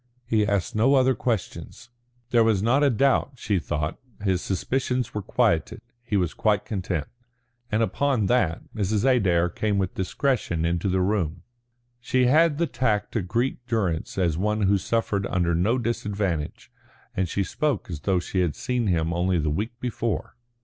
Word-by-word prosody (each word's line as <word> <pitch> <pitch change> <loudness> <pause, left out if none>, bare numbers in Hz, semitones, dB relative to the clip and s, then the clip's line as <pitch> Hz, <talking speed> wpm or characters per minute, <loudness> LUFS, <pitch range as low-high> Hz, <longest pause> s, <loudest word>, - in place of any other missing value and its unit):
He 105 -2 +1
asked 100 -3 0
no 120 +6 +4
other 130 0 +4
questions. 120 0 -4 0.4
There 120 -1 +5
was 110 -3 +2
not 130 +6 +3
a 145 - +5
doubt, 135 +2 +2
she 105 -6 -1
thought; 75 0 -3 0.2
his 95 -3 +1
suspicions 125 +4 -1
were 105 - -2
quieted; - - +1 0.2
he 115 -4 -1
was 90 -4 0
quite 105 -2 +1
content. 90 -7 -2 0.7
And 110 +2 +2
upon 130 -2 +1
that 95 -7 +1
Mrs. 105 +2 0
Adair 95 -10 +3
came 100 +4 -1
with 95 -2 -1
discretion 95 - -1
into 85 +3 0
the 95 0 +1
room. 90 -4 -1 0.6
She 125 +1 +1
had 155 +3 +4
the 170 - +2
tact 120 -6 0
to 115 - -1
greet 120 +7 -1
Durrance 100 -11 -1
as 85 -4 +1
one 105 +2 0
who 100 0 +3
suffered 100 -2 -1
under 85 -1 +1
no 100 +9 +2
disadvantage, 105 -9 -2 0.4
and 95 -2 0
she 100 - 0
spoke 145 +2 -1
as 85 -5 -5
though 90 +5 +1
she 95 +2 -3
had 85 -5 +1
seen 125 -3 -1
him 85 -2 +1
only 90 +1 +1
the 75 -2 0
week 110 +9 -3
before. 120 -4 -3
105 Hz, 170 wpm, -25 LUFS, 90-120 Hz, 0.7 s, There